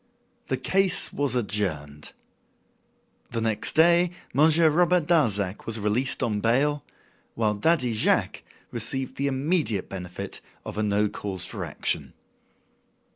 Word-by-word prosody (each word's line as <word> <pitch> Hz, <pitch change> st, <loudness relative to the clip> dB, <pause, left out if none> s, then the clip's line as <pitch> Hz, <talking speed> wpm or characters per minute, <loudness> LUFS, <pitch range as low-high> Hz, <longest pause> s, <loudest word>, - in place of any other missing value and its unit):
The 130 Hz, -, -1 dB
case 190 Hz, +7 st, +1 dB
was 140 Hz, -3 st, -1 dB
adjourned. 90 Hz, -, -2 dB, 1.2 s
The 115 Hz, -, -3 dB
next 110 Hz, -2 st, 0 dB
day 170 Hz, +2 st, +5 dB, 0.2 s
Monsieur 160 Hz, +4 st, +5 dB
Robert 175 Hz, +1 st, +3 dB
Darzac 105 Hz, -, +1 dB
was 115 Hz, -1 st, -2 dB
released 110 Hz, +6 st, 0 dB
on 105 Hz, -3 st, 0 dB
bail, 135 Hz, +6 st, +1 dB, 0.5 s
while 110 Hz, -2 st, +1 dB
Daddy 125 Hz, +2 st, +1 dB
Jacques 110 Hz, -, +1 dB, 0.3 s
received 125 Hz, +3 st, -3 dB
the 140 Hz, -, 0 dB
immediate 140 Hz, -, 0 dB
benefit 90 Hz, -2 st, -7 dB, 0.2 s
of -, -, -5 dB
a -, -, +1 dB
"no 105 Hz, 0 st, +1 dB
cause 95 Hz, -3 st, -1 dB
for -, -, -5 dB
action." -, -, -2 dB
120 Hz, 125 wpm, -25 LUFS, 105-150 Hz, 1.2 s, day